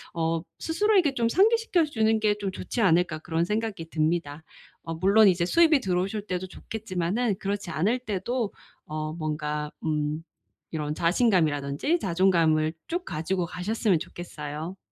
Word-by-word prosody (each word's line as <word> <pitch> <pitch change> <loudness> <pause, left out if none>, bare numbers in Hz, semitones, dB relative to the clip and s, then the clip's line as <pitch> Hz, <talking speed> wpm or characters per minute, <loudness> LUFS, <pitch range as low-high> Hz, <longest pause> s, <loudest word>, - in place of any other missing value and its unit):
어 165 0 0 0.2
스스로에게 365 -3 +2
좀 235 -3 +1
상기시켜 405 - +3
주는 220 -6 +1
게 215 -1 +3
좀 200 -2 -2
좋지 210 +5 -4
않을까.' 170 -4 +3
그런 165 +1 -1
생각이 210 -4 -2
듭니다. 160 -1 -1 0.4
어 165 - -4
물론 200 +5 +5
이제 175 -2 +3
수입이 320 - +5
들어오실 195 +2 -1
때도 185 -2 -3
좋겠지만은 205 +2 -2
그렇지 200 -1 -3
않을 190 - +1
때도 225 +1 -2 0.3
어 155 0 -4
뭔가 150 -2 -3
음. 150 0 -1 0.5
이런 150 -1 -2
자신감이라든지 170 - +2
자존감을 165 -4 +2 0.2
쭉 350 +2 -2
가지고 175 - -2
가셨으면 185 +1 0
좋겠어요. 155 +1 -7
180 Hz, 335 characters per minute, -26 LUFS, 160-220 Hz, 0.5 s, 물론